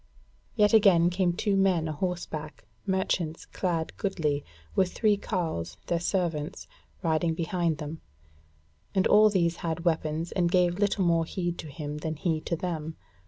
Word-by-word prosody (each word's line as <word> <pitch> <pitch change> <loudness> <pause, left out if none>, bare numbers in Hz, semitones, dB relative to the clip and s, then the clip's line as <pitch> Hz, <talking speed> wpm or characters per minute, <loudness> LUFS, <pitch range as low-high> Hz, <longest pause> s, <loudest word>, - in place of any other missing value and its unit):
Yet 210 -1 +4
again 185 -6 +6
came 180 -1 +2
two 200 +3 0
men 185 -4 +2
a - - -2
horseback, 155 - -4 0.2
merchants 185 -4 -1
clad 170 -4 -2
goodly, 150 -7 -1 0.3
with 185 -2 +2
three 215 -2 +3
carles, 165 - -3
their 170 - 0
servants, 170 -2 -2 0.4
riding 165 0 +1
behind 170 -1 0
them; 150 +1 -6 0.9
and 190 - +3
all 215 0 +6
these 170 -4 +1
had 165 +1 -3
weapons 160 0 0
and 175 -2 +1
gave 180 0 +2
little 205 -2 +2
more 165 -1 +3
heed 175 0 -3
to 160 - -6
him 150 0 -6
than 160 +1 -3
he 160 0 -1
to 170 - -2
them. 160 -2 -4
170 Hz, 155 wpm, -28 LUFS, 160-185 Hz, 0.9 s, again